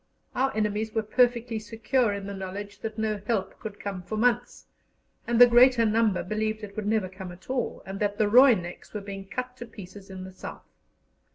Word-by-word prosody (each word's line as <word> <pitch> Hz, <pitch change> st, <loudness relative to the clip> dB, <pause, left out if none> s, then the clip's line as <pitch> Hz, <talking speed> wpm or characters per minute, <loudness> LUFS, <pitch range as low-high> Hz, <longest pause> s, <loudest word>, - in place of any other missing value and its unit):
Our 265 Hz, +1 st, +1 dB
enemies 215 Hz, +1 st, -1 dB
were 220 Hz, -, +1 dB
perfectly 235 Hz, 0 st, +2 dB
secure 225 Hz, +2 st, 0 dB
in 200 Hz, -1 st, -4 dB
the 200 Hz, -, -5 dB
knowledge 200 Hz, +2 st, -6 dB
that 220 Hz, 0 st, -5 dB
no 215 Hz, -2 st, -1 dB
help 205 Hz, -5 st, -1 dB
could 210 Hz, -2 st, -7 dB
come 195 Hz, -3 st, -4 dB
for 215 Hz, +4 st, -5 dB
months, 245 Hz, +1 st, +1 dB, 0.6 s
and 235 Hz, 0 st, +1 dB
the 245 Hz, -, +12 dB
greater 240 Hz, 0 st, +6 dB
number 215 Hz, -3 st, +2 dB
believed 215 Hz, +2 st, -2 dB
it 200 Hz, -1 st, -8 dB
would 215 Hz, -1 st, -3 dB
never 215 Hz, -3 st, +1 dB
come 185 Hz, 0 st, -8 dB
at 180 Hz, +8 st, -10 dB
all, 260 Hz, -2 st, -2 dB
and 195 Hz, +1 st, -6 dB
that 205 Hz, -1 st, 0 dB
the 215 Hz, -1 st, +3 dB
"Roineks" 215 Hz, -7 st, +4 dB
were 210 Hz, -, -2 dB
being 195 Hz, -1 st, -7 dB
cut 250 Hz, +4 st, -5 dB
to 240 Hz, -, -8 dB
pieces 200 Hz, -2 st, -11 dB
in 190 Hz, -1 st, -7 dB
the 185 Hz, 0 st, -9 dB
South. 185 Hz, -, -9 dB
215 Hz, 200 wpm, -27 LUFS, 200-235 Hz, 0.6 s, the